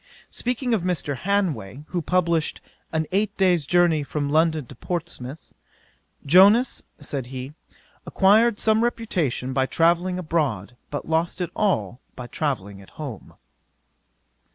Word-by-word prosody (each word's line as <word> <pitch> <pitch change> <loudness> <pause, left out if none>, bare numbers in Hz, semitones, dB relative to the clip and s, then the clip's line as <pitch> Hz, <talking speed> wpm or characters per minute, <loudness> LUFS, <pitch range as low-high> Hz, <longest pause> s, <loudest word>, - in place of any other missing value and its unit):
'Speaking 245 0 -1
of 215 - +1
Mr. 170 -5 -1
Hanway, 150 - -1
who 175 - -2
published 170 -2 0 0.3
An 160 -1 0
Eight 205 +2 0
Days' 180 -6 +2
Journey 175 -3 +3
from 145 0 -3
London 160 -2 +2
to 130 - -12
Portsmouth, 145 -1 -6 0.7
"Jonas, 200 - +5 0.2
(said 135 -4 -4
he,) 130 +2 -7 0.5
acquired 210 +3 +4
some 220 +1 +3
reputation 175 - -1
by 130 0 +1
travelling 175 +4 +2
abroad, 145 - -2
but 145 - -5
lost 165 +3 0
it 180 - -3
all 125 - 0 0.2
by 125 - -7
travelling 105 -9 -3
at 95 - -16
home. 140 -9 -8
165 Hz, 130 wpm, -24 LUFS, 135-185 Hz, 0.7 s, Jonas